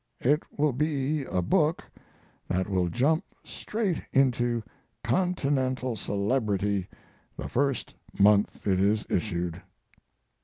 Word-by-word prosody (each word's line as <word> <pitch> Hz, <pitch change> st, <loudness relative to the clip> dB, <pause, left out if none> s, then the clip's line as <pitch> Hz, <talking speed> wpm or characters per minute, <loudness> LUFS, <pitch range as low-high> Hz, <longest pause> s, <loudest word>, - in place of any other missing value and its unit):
It 145 Hz, +5 st, +3 dB, 0.2 s
will 150 Hz, -2 st, +2 dB
be 145 Hz, +1 st, 0 dB
a 90 Hz, -6 st, -1 dB
book 160 Hz, -, +2 dB, 0.6 s
that 95 Hz, +1 st, 0 dB
will 90 Hz, -3 st, +1 dB
jump 145 Hz, -, +2 dB, 0.2 s
straight 210 Hz, -6 st, -2 dB
into 120 Hz, -3 st, +2 dB, 0.4 s
continental 130 Hz, -4 st, 0 dB
celebrity 100 Hz, -2 st, 0 dB, 0.5 s
the -, -, -4 dB
first 135 Hz, 0 st, -1 dB, 0.2 s
month 100 Hz, +1 st, +3 dB
it 95 Hz, -2 st, +2 dB
is 105 Hz, +2 st, +2 dB
issued. 85 Hz, 0 st, -1 dB
120 Hz, 105 wpm, -28 LUFS, 100-145 Hz, 0.6 s, It